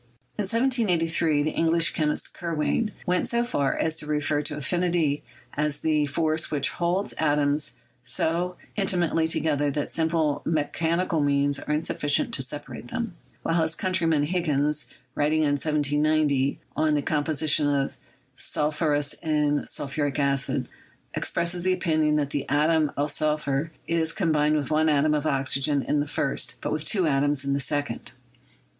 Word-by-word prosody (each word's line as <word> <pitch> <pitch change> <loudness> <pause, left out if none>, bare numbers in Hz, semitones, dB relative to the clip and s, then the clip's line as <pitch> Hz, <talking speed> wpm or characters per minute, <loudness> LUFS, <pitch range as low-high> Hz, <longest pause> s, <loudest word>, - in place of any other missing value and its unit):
In 210 - -1
1783, 180 - +2
the 155 - 0
English 165 0 +3
chemist 150 -1 -2
Kirwan 170 +6 -1
went 180 0 +1
so 235 0 +1
far 145 - 0
as 160 0 -1
to 150 - -6
refer 150 0 0
to 150 0 -5
affinity 170 -1 +1 0.3
as 150 0 -1
that 150 -2 +1
force 155 0 +1
which 145 -3 +1
holds 180 +3 -1
atoms 145 -1 +1 0.3
so 165 +8 -1 0.2
inti 195 -3 +1
mately 165 -2 +1
together 145 -3 +1
that 145 +1 -3
simple 160 -2 +1
mechanical 165 +2 0
means 140 0 +1
are - - -5
insuffi 150 -1 -3
cient 145 - +2
to - - 0
separate 130 -2 -8
them; 225 - -4 0.3
while 165 0 +1
his 160 0 0
countryman, 165 -5 +1
Higgins, 150 -3 0 0.3
writing 155 +2 +1
in 145 - +2
1790 150 -2 +1 0.2
on 155 -1 +2
the 145 - 0
composition 150 0 +2
of 140 -1 0 0.4
sulphurous 150 -1 0
and 150 -2 0
sul - - -4
phuric 145 0 -2
acids, 140 -1 +1 0.5
expressed 170 +1 -1
the 185 +1 +2
opinion 155 -4 +1
that 145 -2 0
the 145 - -3
atom 155 +1 +2
of 145 +1 0
sul 155 0 +1
phur 145 +1 -2 0.2
is 165 -1 0
combined 155 -6 +2
with 150 -1 -2
one 155 +1 +3
atom 150 +1 +3
of 150 0 0
oxygen 135 +1 +2
in 150 - 0
the 145 - -1
first, 140 -1 -1
but - - -3
with 155 0 -2
two 190 -5 +2
atoms 145 -1 +1
in 140 - 0
the 140 - 0
second. 145 +1 -3
150 Hz, 160 wpm, -25 LUFS, 145-165 Hz, 0.5 s, English